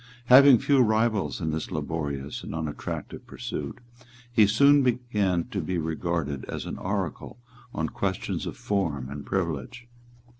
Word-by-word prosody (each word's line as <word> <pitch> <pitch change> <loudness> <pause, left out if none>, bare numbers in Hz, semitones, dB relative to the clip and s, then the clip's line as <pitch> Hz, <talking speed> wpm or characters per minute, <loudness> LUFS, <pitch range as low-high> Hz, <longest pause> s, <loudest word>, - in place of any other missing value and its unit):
Having 135 0 +9
few 140 +3 +2
rivals 110 - +2
in 80 - -1
this 80 0 -3
laborious 70 -3 -4
and - - -7
unattractive 80 -2 -5
pursuit, 70 - -5 0.5
he 110 -3 +5
soon 140 +7 +5
began 115 -8 +1
to 100 - -2
be 90 +3 -2
regarded 80 -3 -2
as - - -5
an - - -6
oracle 95 -1 -3 0.3
on 80 -5 -2
questions - - -3
of - - -6
form 75 -10 -2
and 70 0 -7
privilege. 85 - -3
90 Hz, 140 wpm, -26 LUFS, 75-115 Hz, 0.5 s, Having